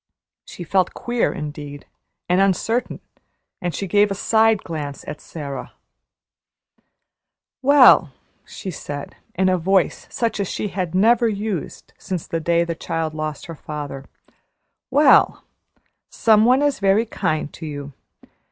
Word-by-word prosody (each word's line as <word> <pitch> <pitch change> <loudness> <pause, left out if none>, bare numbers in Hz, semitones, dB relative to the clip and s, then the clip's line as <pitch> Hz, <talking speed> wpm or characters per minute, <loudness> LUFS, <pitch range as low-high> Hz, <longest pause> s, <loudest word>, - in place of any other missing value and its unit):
She 175 - -9
felt 185 +1 +1
queer 240 -1 0
indeed 145 -1 -7 0.4
and 180 +2 +3
uncertain, 200 +5 0 0.6
and 175 -2 -2
she 200 - -3
gave 205 +2 +3
a 195 - -2
side 220 +1 +2
glance 150 -4 -6
at 150 - -7
Sara. 140 -5 -7 1.9
"Well," 260 - +6 0.3
she 190 - -7
said, 145 -2 -7 0.2
in 185 +1 +2
a 185 -1 +2
voice 190 +2 +1
such 230 -3 -2
as 200 - -1
she 210 - -3
had 180 -2 -3
never 230 +4 +4
used 205 -5 -5
since 185 -4 -4
the 165 - -3
day 170 +1 +2
the 170 0 -3
child 165 -1 -3
lost 155 -1 -5
her 165 - -7
father 145 -3 -7 0.8
"well, 295 +1 +4 0.7
some 220 -1 +4
one 255 +4 +4
is 290 -1 +1
very 200 +3 +3
kind 155 -9 -2
to 160 - -8
you. 145 -1 -7
180 Hz, 135 wpm, -21 LUFS, 155-215 Hz, 1.9 s, Well